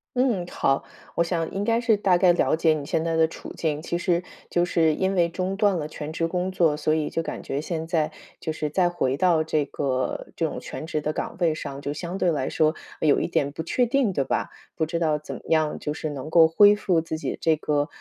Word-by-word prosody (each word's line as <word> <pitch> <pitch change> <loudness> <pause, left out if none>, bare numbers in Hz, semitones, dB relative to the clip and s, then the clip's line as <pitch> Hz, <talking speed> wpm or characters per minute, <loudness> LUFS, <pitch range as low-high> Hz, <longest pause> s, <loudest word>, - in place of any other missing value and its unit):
嗯， 235 -9 +1
好， 135 -5 0 0.3
我 170 - +2
想 165 -1 -2
应 195 +1 -2
该 230 +2 +2
是 230 -2 +3
大 190 -3 +3
概 175 -1 +5
了 170 - +2
解 160 -1 +3
你 145 -2 -4
现 160 - 0
在 165 -1 0
的 160 0 +4
处 - - -9
境。 155 -2 -1
其 170 0 -2
实 175 -1 +1 0.3
就 175 0 +2
是 160 -3 +2
因 190 +1 0
为 170 -2 +2
中 185 +2 -2
断 200 -3 +2
了 150 -1 -3
全 155 0 -6
职 165 +1 -1
工 180 +2 -2
作， 165 -5 +2
所 155 +1 +1
以 155 -2 0
就 165 - -1
感 - - -6
觉 140 +2 -3
现 160 0 -3
在 160 -2 0 0.3
就 160 - -3
是 150 -1 -3
再 180 0 +3
回 135 -6 0
到 165 -1 +3
这 155 -2 0
个 130 -2 -2
这 - - 0
种 - - -5
全 160 - -7
职 155 -2 -2
的 155 +1 -2
岗 - - -4
位 165 -3 +3
上， 140 -2 -6
就 145 0 -3
相 175 +4 -5
对 175 -3 +2
来 140 -4 -1
说 155 0 +2 0.3
有 150 -2 +3
一 - - -1
点 145 -4 0
不 160 - -5
确 245 +9 +1
定， 250 -4 +2
对 140 -6 0
吧？ - - -1 0.3
不 160 -1 0
知 170 +1 -2
道 155 -3 +1
怎 150 - -7
么 - - -9
样 155 -2 +2
就 150 - -3
是 155 0 -4
能 145 +2 -6
够 165 -2 +7
恢 205 +5 +6
复 180 -5 +1
自 160 -1 -4
己 - - -2
的 - - -9
这 160 -1 +3
个， 150 -1 0
165 Hz, 275 characters per minute, -25 LUFS, 155-180 Hz, 0.3 s, 够